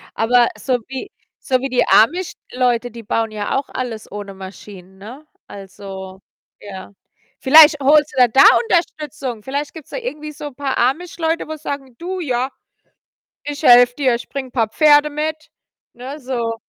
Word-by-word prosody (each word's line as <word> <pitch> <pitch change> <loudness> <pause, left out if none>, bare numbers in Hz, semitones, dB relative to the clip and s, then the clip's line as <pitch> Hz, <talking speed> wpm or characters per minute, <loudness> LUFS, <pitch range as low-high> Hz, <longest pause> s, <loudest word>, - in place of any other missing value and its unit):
aber 240 +1 +3
so 250 +4 -1
wie 265 -1 -7 0.3
so 260 -4 0
wie 270 +1 -4
die 250 - +2
Amish-Leute, 250 -4 +1
die 230 -1 -10
bauen 225 +1 -1
ja 210 +2 -3
auch 275 - -4
alles 230 -5 -6
ohne 205 -1 -7
Maschinen, 190 0 -12
ne? 245 +10 -12 0.2
Also, 190 -1 -10 0.4
ja. 190 -1 -10 0.5
Vielleicht 300 +1 +7
holst 295 +2 +4
du - - +5
dir 245 - +5
da 265 - +4 0.2
Unterstützung. 295 - -2
Vielleicht 285 +2 -4
gibt's 320 -4 -12
da - - -4
irgendwie 305 -11 -6
so 295 0 -8
paar 270 +1 -3
Amish-Leute, 325 +6 -1
wo 315 - -5
sagen: 280 -4 -7
„Du, 370 +2 -5
ja, 255 -4 -1 0.9
ich 290 +1 -6
helfe 245 -1 +6
dir, 265 -4 +1
ich 235 - -8
bringe 265 -3 -6
paar 225 -4 0
Pferde 300 +2 +4
mit.“ 310 +1 -4 0.4
Ne, 265 +5 -8
so. 245 -3 -3
260 Hz, 160 wpm, -19 LUFS, 230-295 Hz, 0.9 s, Vielleicht